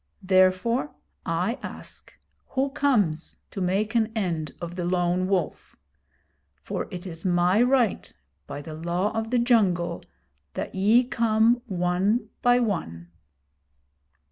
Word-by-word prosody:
Therefore, 185 Hz, +8 st, +2 dB, 0.3 s
I 180 Hz, +9 st, -1 dB
ask, -, -, -10 dB, 0.3 s
who 275 Hz, +1 st, -1 dB
comes 205 Hz, -, +1 dB
to 195 Hz, -, -5 dB
make 195 Hz, +4 st, 0 dB
an 225 Hz, -2 st, +2 dB
end 165 Hz, -8 st, -2 dB
of 175 Hz, 0 st, -6 dB
the 180 Hz, -, -3 dB
Lone 175 Hz, +1 st, +1 dB
Wolf? 190 Hz, -3 st, -2 dB, 0.9 s
For -, -, -4 dB
it 180 Hz, 0 st, -7 dB
is 165 Hz, -3 st, -7 dB
my 180 Hz, +3 st, +3 dB
right, 250 Hz, -4 st, +2 dB, 0.4 s
by 145 Hz, -, -6 dB
the 155 Hz, -, -8 dB
Law 175 Hz, +5 st, -1 dB
of 225 Hz, 0 st, -2 dB
the 250 Hz, -, +1 dB
Jungle, 195 Hz, -, +2 dB, 0.5 s
that -, -, -4 dB
ye 210 Hz, +6 st, +4 dB
come 230 Hz, 0 st, +2 dB
one 185 Hz, +4 st, 0 dB
by 245 Hz, -1 st, +5 dB
one.' 85 Hz, -, -3 dB
190 Hz, 125 wpm, -25 LUFS, 175-230 Hz, 0.9 s, by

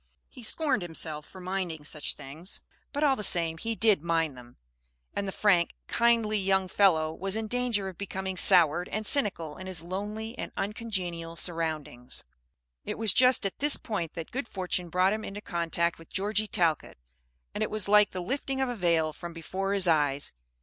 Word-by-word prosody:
He 255 Hz, -, -13 dB
scorned 275 Hz, 0 st, +1 dB
himself 160 Hz, -3 st, 0 dB
for 190 Hz, -, -12 dB
minding 180 Hz, -4 st, -3 dB
such 150 Hz, 0 st, -1 dB
things; 155 Hz, +8 st, -6 dB, 0.3 s
but 290 Hz, +1 st, -2 dB
all 280 Hz, -3 st, +4 dB
the 215 Hz, -, -5 dB
same 165 Hz, -5 st, +2 dB
he 225 Hz, +4 st, -2 dB
did 215 Hz, -6 st, +4 dB
mind 165 Hz, -3 st, 0 dB
them, 120 Hz, -1 st, -14 dB, 0.6 s
and 200 Hz, -, -2 dB
the -, -, -2 dB
frank, 185 Hz, -4 st, +2 dB
kindly 230 Hz, -3 st, +2 dB
young 190 Hz, -1 st, +1 dB
fellow 165 Hz, -5 st, +3 dB
was 195 Hz, +4 st, -3 dB
in 220 Hz, 0 st, -2 dB
danger 240 Hz, -4 st, -1 dB
of 185 Hz, -3 st, -9 dB
becoming 190 Hz, -1 st, -4 dB
soured 175 Hz, -2 st, +5 dB
and 215 Hz, +1 st, -3 dB
cynical 190 Hz, -, +2 dB
in 185 Hz, -, -8 dB
his 180 Hz, -3 st, -1 dB
lonely 210 Hz, +6 st, -5 dB
and -, -, -4 dB
uncongenial 185 Hz, -6 st, -3 dB
surroundings. 155 Hz, -8 st, -3 dB, 0.6 s
It -, -, -5 dB
was 220 Hz, -4 st, +2 dB
just 255 Hz, -3 st, +6 dB
at 195 Hz, -, -3 dB
this 295 Hz, +1 st, +5 dB
point 185 Hz, -8 st, -4 dB
that 165 Hz, -2 st, -6 dB
good 260 Hz, 0 st, -3 dB
fortune 180 Hz, -3 st, -2 dB
brought 185 Hz, +3 st, +3 dB
him 215 Hz, 0 st, -4 dB
into 200 Hz, 0 st, -6 dB
contact 170 Hz, -3 st, -1 dB
with 165 Hz, -, -15 dB
Georgie 210 Hz, +2 st, 0 dB
Talcott, 165 Hz, -6 st, 0 dB, 0.6 s
and -, -, -4 dB
it -, -, 0 dB
was 215 Hz, -2 st, +1 dB
like 210 Hz, 0 st, +6 dB
the 180 Hz, -1 st, -5 dB
lifting 270 Hz, +5 st, -2 dB
of 265 Hz, -1 st, 0 dB
a 245 Hz, -, -3 dB
veil 165 Hz, -5 st, +1 dB
from 170 Hz, +1 st, -8 dB
before 190 Hz, +4 st, -3 dB
his 195 Hz, -2 st, +4 dB
eyes. 145 Hz, -4 st, +1 dB
190 Hz, 185 wpm, -28 LUFS, 165-215 Hz, 0.6 s, just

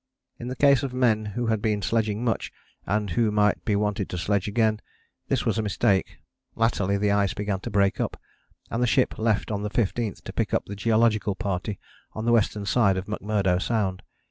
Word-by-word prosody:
In 120 Hz, -, -6 dB
the 130 Hz, -, -4 dB
case 140 Hz, -1 st, +4 dB
of 130 Hz, -2 st, -4 dB
men 115 Hz, -4 st, +2 dB
who 105 Hz, +4 st, -3 dB
had 110 Hz, -2 st, 0 dB
been 105 Hz, -2 st, 0 dB
sledging 110 Hz, +2 st, 0 dB
much, 115 Hz, -, -1 dB, 0.4 s
and 105 Hz, 0 st, 0 dB
who 115 Hz, +5 st, +2 dB
might 105 Hz, -1 st, +2 dB
be 105 Hz, -, +1 dB
wanted 105 Hz, -1 st, -1 dB
to 90 Hz, -, -4 dB
sledge 100 Hz, +2 st, 0 dB
again, 110 Hz, 0 st, +1 dB, 0.5 s
this -, -, 0 dB
was -, -, +1 dB
a -, -, +2 dB
mistake. 100 Hz, -2 st, 0 dB, 0.4 s
Latterly 100 Hz, -4 st, +1 dB
the 100 Hz, 0 st, +1 dB
ice 100 Hz, -2 st, +1 dB
began 100 Hz, -2 st, -2 dB
to -, -, -6 dB
break 100 Hz, -1 st, +2 dB
up, -, -, -3 dB, 0.5 s
and 115 Hz, -, -1 dB
the 125 Hz, -, +3 dB
ship 130 Hz, +2 st, +1 dB
left 110 Hz, -1 st, 0 dB
on 100 Hz, -1 st, -2 dB
the 105 Hz, -, -2 dB
15th, 110 Hz, 0 st, -1 dB
to -, -, -8 dB
pick -, -, 0 dB
up -, -, 0 dB
the 100 Hz, -, -7 dB
Geological 110 Hz, -1 st, +2 dB
Party 100 Hz, -1 st, -3 dB, 0.4 s
on 110 Hz, -, -5 dB
the 120 Hz, -, +3 dB
western 105 Hz, -3 st, +2 dB
side 100 Hz, -2 st, +3 dB
of 95 Hz, -, -3 dB
McMurdo 100 Hz, -3 st, 0 dB
Sound. 95 Hz, -2 st, -1 dB
105 Hz, 205 wpm, -25 LUFS, 100-115 Hz, 0.5 s, case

